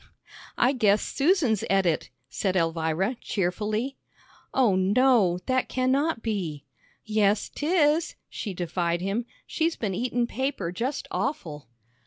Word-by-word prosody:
"I 250 - +4
guess 215 -5 +3
Susan's 280 - +2
et 195 -1 +3
it," 165 -3 0 0.2
said 190 +6 -2
Elvira, 165 +6 0
cheerfully. 215 +7 -2 0.5
"Oh, 240 -8 +3
no, 200 -1 +3
that 255 0 0
cannot 260 +1 +1
be." 180 - -3 0.4
"Yes, 210 -1 +2
'tis," 310 0 +2
she 200 -4 -5
defied 170 0 -1
him, 205 +6 -2 0.2
"she's 325 0 0
been 205 -4 -2
eatin' 245 +3 0
paper 250 -7 -2
just 245 +10 -3
awful." 155 - -3
215 Hz, 120 wpm, -26 LUFS, 185-260 Hz, 0.5 s, I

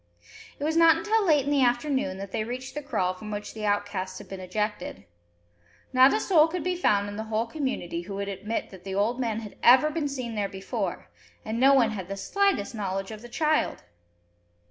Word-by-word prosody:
It - - -6
was 315 +2 0
not 330 -1 +6
until 425 +5 +1
late 295 -4 +4
in 285 - -1
the 285 -2 +3
afternoon 245 -5 +1
that 195 0 -7
they 215 - -1
reached 255 +3 -6
the 295 - -4
kraal 185 -10 -1
from 210 +3 -9
which 210 0 -5
the 215 -1 -3
outcasts 200 -2 -1
had - - -10
been 195 - -7
ejected. 185 - -3 0.9
Not 260 +1 +7
a - - +1
soul 330 -7 +5
could 340 0 -4
be 365 0 0
found 205 - +2
in 205 0 -6
the 220 - -4
whole 220 +1 -1
community 240 - -3
who 195 +3 -7
would 200 0 -3
admit 205 +3 -4
that 190 -2 -12
the 190 0 -5
old 220 +5 +1
man 225 -3 -1
had 210 -2 -10
ever 260 +5 +6
been 305 -2 -1
seen 255 -4 -4
there 205 -2 -1
before, 190 0 -4 0.3
and 220 +2 -3
no 275 +2 +6
one 235 -4 +4
had 190 -4 -5
the 195 +1 -5
slightest 395 - 0
knowledge 195 -2 -3
of 215 -1 -8
the 240 - -11
child! 310 +4 0
225 Hz, 215 wpm, -27 LUFS, 200-285 Hz, 0.9 s, Not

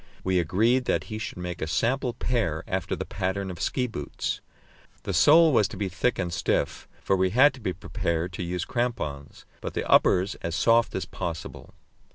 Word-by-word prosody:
We 95 -1 +2
agreed 110 +10 +2
that - - +1
he 110 - -3
should 105 - -5
make 90 -1 -5
a 80 - -1
sample 120 +8 0
pair 115 -11 -1
after - - -2
the - - -5
pattern 95 +1 -2
of 85 - -8
ski 125 - 0
boots. 90 - -4 0.6
The - - -3
sole 160 +1 +6
was 110 -5 +4
to - - -9
be 100 -2 -2
thick 110 +7 0
and 90 -3 -2
stiff 85 - -1 0.2
for 95 - +2
we 95 0 +2
had 130 +8 +5
to 130 - -12
be 105 -5 -2
prepared 90 -2 -3
to 90 - -4
use 90 0 -3
crampons 115 - -3 0.2
but - - -5
the - - -2
uppers 95 +3 +4
as 85 0 -3
soft 115 +3 +3
as 95 - -2
possible. 85 -2 -6
95 Hz, 195 wpm, -26 LUFS, 85-120 Hz, 0.6 s, sole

